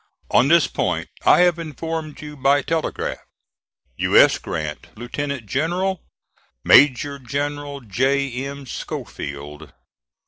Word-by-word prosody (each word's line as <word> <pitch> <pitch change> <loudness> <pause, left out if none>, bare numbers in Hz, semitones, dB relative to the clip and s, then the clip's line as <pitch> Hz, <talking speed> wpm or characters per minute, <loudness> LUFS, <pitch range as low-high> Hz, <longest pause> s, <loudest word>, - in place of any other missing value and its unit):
On 130 - +5
this 165 +1 +5
point - - -2 0.2
I - - +7
have 175 -1 +3
informed 160 0 -5
you 150 0 -8
by 140 +1 +2
telegraph. 165 -1 -2 0.8
"U. - - +2
S. - - +6
GRANT, 75 -2 -5
Lieutenant 130 +1 -4
General. 175 - -1 0.6
"MAJOR 140 0 +5
GENERAL 145 +2 -4
J. 135 +5 0
M. 140 0 -7
SCHOFIELD." 75 - -7
140 Hz, 110 wpm, -21 LUFS, 125-155 Hz, 0.8 s, I